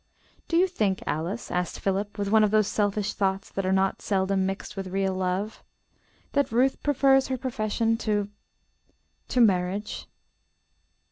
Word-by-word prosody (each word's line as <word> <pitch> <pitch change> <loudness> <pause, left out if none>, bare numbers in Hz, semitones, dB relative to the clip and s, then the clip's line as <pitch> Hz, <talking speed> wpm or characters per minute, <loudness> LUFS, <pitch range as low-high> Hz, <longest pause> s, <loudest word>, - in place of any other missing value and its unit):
"Do 335 - +1
you 360 - +6
think, 210 - -1
Alice," 170 +9 -3
asked 180 0 -2
Philip 200 +2 -2
with 200 -1 -2
one 220 0 +6
of 210 - +4
those 215 0 +3
selfish 205 0 0
thoughts 195 -1 -1
that 195 -1 -2
are - - +2
not 190 0 +1
seldom 190 -1 +1
mixed 195 +2 -5
with 195 -1 -4
real 190 0 0
love, 185 +3 -2 0.7
"that 285 -4 +1
Ruth 255 +4 +2
prefers 270 -2 +3
her 260 - -2
profession 225 -2 0
to 210 -3 0 1.0
to 255 - 0
marriage?" 195 -1 +1
205 Hz, 150 wpm, -26 LUFS, 190-225 Hz, 1.0 s, you